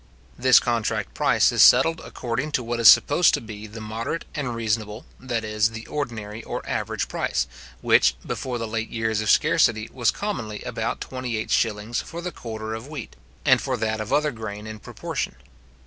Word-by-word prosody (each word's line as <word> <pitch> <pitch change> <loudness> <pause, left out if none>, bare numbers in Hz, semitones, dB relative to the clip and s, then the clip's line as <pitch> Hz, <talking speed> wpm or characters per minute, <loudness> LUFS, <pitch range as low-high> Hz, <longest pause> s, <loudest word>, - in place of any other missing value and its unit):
This 130 -2 +6
contract 115 -3 -1
price - - +3
is - - +2
settled 165 0 +6
according 125 +5 -4
to 125 - +1
what 120 0 -3
is 115 - +9
supposed 155 +3 +6
to - - -3
be 110 -1 -9
the 110 +2 -9
moderate 115 +9 -4
and 135 -6 -3
reasonable, 110 -1 -2
that 120 -3 -3
is, 105 0 +1
the 115 0 -8
ordinary 115 -6 -5
or - - -5
average - - -2
price, - - -1 0.4
which, - - +4
before 125 -2 -3
the 115 -1 -3
late 115 +1 -3
years 110 -2 -1
of 110 - -2
scarcity, 110 +1 +3
was 125 -3 +2
commonly 115 - -3
about - - -3
28s. 115 -3 -1
for 170 - -8
the 175 +1 -4
quarter 110 -4 -6
of 110 +4 -6
wheat, 145 -6 -8 0.3
and - - +5
for - - -2
that 110 0 -1
of 105 - -6
other 150 0 +2
grain 110 -3 -7
in 110 0 -7
proportion. - - -4
115 Hz, 180 wpm, -24 LUFS, 110-125 Hz, 0.4 s, is